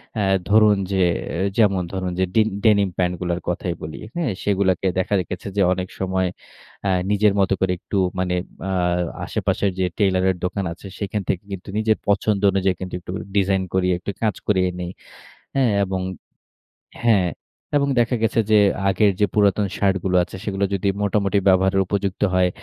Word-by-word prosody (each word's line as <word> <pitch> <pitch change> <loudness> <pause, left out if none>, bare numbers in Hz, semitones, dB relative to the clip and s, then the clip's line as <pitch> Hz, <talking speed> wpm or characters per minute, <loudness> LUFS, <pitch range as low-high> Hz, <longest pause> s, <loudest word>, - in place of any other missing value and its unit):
অ্যা 105 - 0 0.3
ধরুন 105 -1 +5
যে 95 -1 +2 0.3
এ - - -2 0.2
যেমন: 100 -5 +3
ধরুন 95 -1 -2
যে, 95 - +3
ডিন 110 -1 +4 0.2
ডেনিম 100 -3 +4
প্যান্টগুলোর 90 -1 -1
কথাই 90 0 -2
বলি, 75 0 -7 0.2
হ্যাঁ? 165 -9 0
সেগুলাকে 95 -2 +1
দেখা 95 - -1
রেখেছে 90 +2 -5
যে, 100 - +4
অনেক 95 0 -4
সময় 95 -1 0 0.6
অ্যা 100 - 0 0.2
নিজের 105 0 +3
মত 95 - +3
করে 95 -1 +1
একটু 100 - -4 0.2
মানে 90 -1 0 0.3
আ - - -1 0.5
আশেপাশের 100 - 0
যে 95 - +2
টেইলরের 95 -2 +2
দোকান 95 +2 -2
আছে, 95 - -12
সেখান 105 0 -2
থেকে 90 - -1
কিন্তু 95 0 -7
নিজের 110 0 +2
পছন্দ 100 0 +1
অনুযায়ী 95 -1 +1
কিন্তু 95 -1 -6
একটু 90 - -9
করে - - -5
ডিজাইন 95 -1 +2
করিয়ে, 90 -1 +2
একটু 100 - -4
কাজ 105 -4 +1
করিয়ে 95 -3 +2
নেই। 90 0 -4 0.6
হ্যাঁ? 130 -4 +3
এবং 95 -1 -2 1.0
হ্যাঁ। 100 -6 +4 0.5
এবং 140 - +1
দেখা 120 +1 +1
গেছে 115 0 +2
যে 110 - +6 0.3
আগের 100 +2 +3
যে 105 - +5
পুরাতন 100 -1 +3
শার্টগুলো 95 -2 +1
আছে, 95 - -10
সেগুলো 100 -1 -1
যদি 100 +1 0
মোটামুটি 100 0 +1
ব্যবহারের 95 +1 +4
উপযুক্ত 100 -1 -2
হয়, 90 -1 +4
95 Hz, 170 wpm, -22 LUFS, 95-105 Hz, 1.0 s, যে